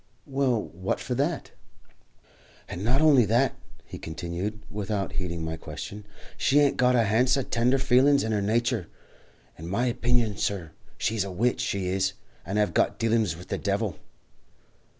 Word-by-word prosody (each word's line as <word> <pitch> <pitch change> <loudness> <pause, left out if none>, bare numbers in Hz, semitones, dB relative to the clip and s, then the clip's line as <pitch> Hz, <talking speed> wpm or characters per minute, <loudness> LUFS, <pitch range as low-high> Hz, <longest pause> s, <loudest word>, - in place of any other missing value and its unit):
"Well, 135 -4 +1
what 95 +3 -3
for 125 - -3
that?" 145 +6 -1 1.2
"And 90 - -6
not 125 +6 +3
honly 145 -6 +6
that," 120 +5 +2 0.3
he - - -9
continued, 85 +6 -4
without 100 -1 -3
heeding 85 -3 -3
my 80 0 -4
question, 100 +7 -8 0.3
"she 140 - +2
hain't 145 -2 +5
a - - -14
got 125 0 +4
a 120 - +4
hounce 120 +6 +3
of 135 - -3
tender 120 +3 +3
feelin's 135 +2 +4
in 110 - -1
her 105 -2 +1
natur. 115 -1 0 0.7
In 80 - -7
my 115 +7 +1
opinion, 120 -3 +1
sur, 90 -8 -2 0.3
she's 110 -2 0
a 100 - -5
witch, 115 +7 0
she 100 -2 -1
is, 95 +1 0 0.3
and 95 +3 -1
hev 105 -1 +2
got - - +2
dealin's 115 -5 +1
with 90 - -12
the - - -2
devil." 100 0 -1
110 Hz, 170 wpm, -27 LUFS, 95-125 Hz, 1.2 s, honly